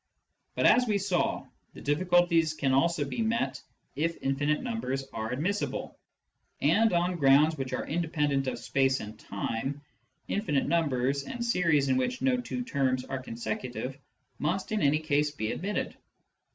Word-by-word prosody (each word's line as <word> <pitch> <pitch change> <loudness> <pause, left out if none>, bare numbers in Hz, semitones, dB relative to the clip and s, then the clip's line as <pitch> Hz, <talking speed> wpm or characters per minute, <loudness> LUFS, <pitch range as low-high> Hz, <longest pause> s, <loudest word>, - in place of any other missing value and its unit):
But, - - +1
as 250 0 +6
we 210 -2 +2
saw, 190 -3 0 0.3
the - - -10
difficulties 170 +1 +3
can 135 -3 +1
also 150 +2 +2
be 185 - -3
met 230 +2 0 0.3
if 165 +3 -1
infinite 145 - 0
numbers 135 - -3
are 110 0 -3
admissible. 175 - -2 0.6
And 225 0 +4
on 175 +1 +1
grounds 145 +2 +5
which 135 -3 -4
are - - -2
independent 150 -4 0
of - - -2
space 135 -1 +1
and 105 +1 -8
time, 115 +8 -3 0.5
infinite 160 -10 0
numbers, 140 -4 +1
and 240 - -4
series 165 -10 +2
in 130 -1 +2
which 245 - -1
no 255 -2 +2
two 250 0 -4
terms 130 - 0
are 135 -1 -4
consecutive, 120 +2 -4 0.4
must 180 +7 -1
in 215 - 0
any 145 +1 +4
case 150 -1 +1
be 110 -7 -3
admitted. 200 +4 -3
150 Hz, 150 wpm, -29 LUFS, 135-180 Hz, 0.6 s, as